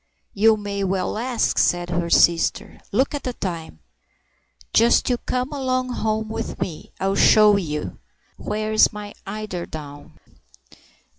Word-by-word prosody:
"You 220 Hz, +2 st, +4 dB
may 200 Hz, -1 st, -4 dB
well 190 Hz, 0 st, -1 dB
ask!" 245 Hz, 0 st, 0 dB
said 175 Hz, 0 st, +1 dB
her 170 Hz, 0 st, -1 dB
sister. 170 Hz, -1 st, +2 dB
"Look 270 Hz, +3 st, +1 dB
at 290 Hz, -, -3 dB
the 250 Hz, -, -4 dB
time! 165 Hz, -, -6 dB, 0.9 s
Just 235 Hz, +2 st, +4 dB
you 245 Hz, -, +1 dB
come 255 Hz, +3 st, -3 dB
along 255 Hz, -2 st, -1 dB
home 220 Hz, -2 st, -1 dB
with 220 Hz, -, -5 dB
me. 160 Hz, -4 st, -5 dB
I'll 195 Hz, +1 st, 0 dB
show 210 Hz, +1 st, +6 dB
you. 150 Hz, -6 st, -3 dB, 0.4 s
Where's 215 Hz, +1 st, +1 dB
my 210 Hz, -1 st, -8 dB
eiderdown?" 170 Hz, -8 st, -7 dB
210 Hz, 130 wpm, -22 LUFS, 175-230 Hz, 0.9 s, show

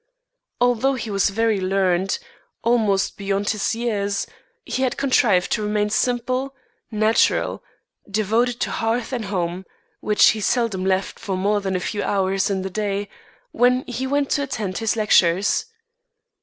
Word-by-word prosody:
Although 245 Hz, +2 st, +2 dB
he 235 Hz, -4 st, -5 dB
was 195 Hz, +1 st, +2 dB
very 220 Hz, 0 st, +1 dB
learned, 190 Hz, 0 st, +1 dB, 0.5 s
almost 220 Hz, -5 st, +1 dB
beyond 200 Hz, 0 st, -1 dB
his 215 Hz, +1 st, -1 dB
years, 205 Hz, -4 st, -1 dB, 0.4 s
he 260 Hz, -, -3 dB
had 260 Hz, -2 st, 0 dB
contrived 245 Hz, -9 st, +2 dB
to 215 Hz, -, +1 dB
remain 210 Hz, 0 st, 0 dB
simple, 255 Hz, +3 st, -1 dB, 0.3 s
natural, 215 Hz, 0 st, +1 dB, 0.5 s
devoted 225 Hz, +4 st, +1 dB
to -, -, 0 dB
hearth 230 Hz, +3 st, -1 dB
and 235 Hz, -4 st, -2 dB
home, 180 Hz, -2 st, -2 dB, 0.4 s
which 210 Hz, -1 st, +4 dB
he 215 Hz, -, -1 dB
seldom 220 Hz, -4 st, 0 dB
left 190 Hz, 0 st, -1 dB
for 190 Hz, -2 st, -3 dB
more 205 Hz, +2 st, +1 dB
than 190 Hz, -1 st, -2 dB
a -, -, +1 dB
few 205 Hz, +3 st, -3 dB
hours 195 Hz, -1 st, 0 dB
in 190 Hz, -2 st, -1 dB
the 190 Hz, -, -3 dB
day, 205 Hz, 0 st, -2 dB, 0.4 s
when 250 Hz, +1 st, +3 dB
he 255 Hz, +1 st, -4 dB
went 285 Hz, 0 st, 0 dB
to 285 Hz, -, +2 dB
attend 215 Hz, -9 st, -3 dB
his 225 Hz, 0 st, 0 dB
lectures. 195 Hz, -, +3 dB
210 Hz, 150 wpm, -22 LUFS, 195-240 Hz, 0.5 s, which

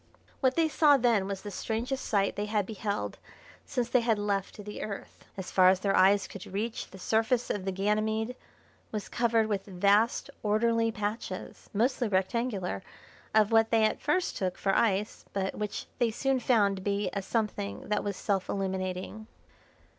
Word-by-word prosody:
What 260 Hz, -2 st, +2 dB
they 330 Hz, -1 st, +3 dB
saw 300 Hz, -2 st, +5 dB
then 230 Hz, -6 st, +2 dB
was 195 Hz, -1 st, -4 dB
the 205 Hz, -, -6 dB
strangest 235 Hz, +7 st, -3 dB
sight 200 Hz, -2 st, +1 dB
they 205 Hz, +1 st, -2 dB
had 210 Hz, -2 st, 0 dB
beheld 210 Hz, 0 st, -3 dB, 0.5 s
since 245 Hz, -3 st, -1 dB
they 250 Hz, +1 st, +3 dB
had 230 Hz, -2 st, +2 dB
left 200 Hz, -2 st, -2 dB
the 210 Hz, -, -6 dB
Earth. 200 Hz, -2 st, -7 dB
As 190 Hz, -, -5 dB
far 185 Hz, -1 st, +6 dB
as 190 Hz, 0 st, +2 dB
their 195 Hz, 0 st, +2 dB
eyes 195 Hz, +2 st, +5 dB
could 200 Hz, -, -9 dB
reach 215 Hz, +4 st, -3 dB
the 190 Hz, -, -11 dB
surface 225 Hz, +5 st, +1 dB
of 190 Hz, -2 st, -3 dB
the 190 Hz, -, 0 dB
Ganymede 215 Hz, +4 st, 0 dB, 0.6 s
was 210 Hz, -2 st, -4 dB
covered 230 Hz, -2 st, +2 dB
with 205 Hz, -2 st, -2 dB
vast 200 Hz, +4 st, +2 dB
orderly 225 Hz, +2 st, +2 dB
patches, 210 Hz, +1 st, -5 dB
mostly 240 Hz, +3 st, +1 dB
rectangular, 195 Hz, -, -1 dB, 0.5 s
of 215 Hz, 0 st, +5 dB
what 225 Hz, 0 st, +5 dB
they 225 Hz, -1 st, +3 dB
at 215 Hz, -, +1 dB
first 325 Hz, +5 st, 0 dB
took 185 Hz, -2 st, -2 dB
for 195 Hz, -1 st, +1 dB
ice, 210 Hz, -1 st, +1 dB
but 195 Hz, -1 st, -1 dB
which 210 Hz, -1 st, -4 dB
they 240 Hz, -, +3 dB
soon 265 Hz, +4 st, 0 dB
found 210 Hz, -6 st, +3 dB
to -, -, -7 dB
be 200 Hz, -1 st, -1 dB
a 200 Hz, -, -1 dB
something 190 Hz, -, -2 dB
that 210 Hz, -1 st, +1 dB
was 200 Hz, -2 st, -3 dB
self 195 Hz, -3 st, -1 dB
illuminating. 190 Hz, +2 st, -3 dB
210 Hz, 175 wpm, -29 LUFS, 195-230 Hz, 0.6 s, far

